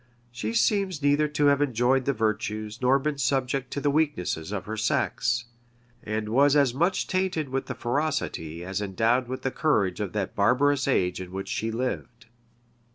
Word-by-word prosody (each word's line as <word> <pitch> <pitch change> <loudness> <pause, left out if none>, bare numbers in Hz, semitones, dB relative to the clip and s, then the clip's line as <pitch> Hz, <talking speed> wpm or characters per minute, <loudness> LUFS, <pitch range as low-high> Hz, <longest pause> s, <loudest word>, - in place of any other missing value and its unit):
She 115 -2 -4
seems 180 - +1
neither 145 +1 +3
to 150 0 0
have 140 0 +4
enjoyed 130 -1 +2
the 140 - +2
virtues, 110 0 -2
nor 130 +2 +4
been 145 +1 -2
subject 130 0 0
to - - -2
the 145 0 +1
weaknesses, 140 - -1
of 95 -3 -4
her 110 - -4
sex; 120 0 0 0.6
and 110 0 -3
was 140 +5 +4
as 140 -4 +4
much 170 +8 +1
tainted 185 -6 -1
with 135 +1 -2
the 125 - -4
ferocity 120 - -2
as 95 +2 -3
endowed 110 +6 +1
with 130 +1 -5
the 135 - 0
courage 105 - +1
of 100 -4 -3
that 100 -2 -3
barbarous 130 +7 +2
age 90 -9 +1
in 90 -1 -8
which 95 +1 -5
she 110 - -2
lived. 120 0 -4
125 Hz, 175 wpm, -26 LUFS, 110-145 Hz, 0.6 s, have